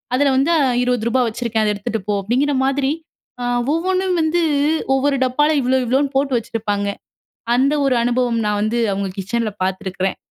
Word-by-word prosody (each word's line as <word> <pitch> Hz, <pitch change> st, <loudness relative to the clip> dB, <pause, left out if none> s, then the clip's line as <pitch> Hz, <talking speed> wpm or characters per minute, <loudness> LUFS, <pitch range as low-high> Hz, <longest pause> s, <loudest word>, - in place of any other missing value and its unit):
அதுல 280 Hz, +1 st, +3 dB
வந்து 290 Hz, +6 st, +2 dB, 0.3 s
ரூ.20 245 Hz, 0 st, +1 dB
வச்சிருக்கேன் 225 Hz, -1 st, -1 dB
அத 210 Hz, -1 st, +1 dB
எடுத்துட்டு 205 Hz, +1 st, -4 dB
போ" 205 Hz, -, +2 dB
அப்டிங்கிற 265 Hz, +7 st, +1 dB
மாதிரி 275 Hz, 0 st, +1 dB, 0.8 s
ஒவ்வொன்னும் 370 Hz, +2 st, 0 dB
வந்து 320 Hz, +2 st, +1 dB, 0.5 s
ஒவ்வொரு 275 Hz, +1 st, +2 dB
டப்பால 295 Hz, +4 st, +2 dB
இவ்ளோ 255 Hz, +1 st, +2 dB
இவ்ளோன்னு 270 Hz, +3 st, +1 dB
போட்டு 275 Hz, 0 st, 0 dB
வச்சிருப்பாங்க. 205 Hz, -3 st, -2 dB, 0.7 s
அந்த 275 Hz, +4 st, +3 dB
ஒரு 270 Hz, -, +2 dB
அனுபவம் 240 Hz, -1 st, +1 dB
நா -, -, +1 dB
வந்து 215 Hz, +3 st, 0 dB
அவுங்க 195 Hz, 0 st, -2 dB
கிச்சன்ல 220 Hz, +4 st, -1 dB
பாத்துருக்குறேன். 190 Hz, 0 st, -2 dB
245 Hz, 145 wpm, -19 LUFS, 215-275 Hz, 0.8 s, அதுல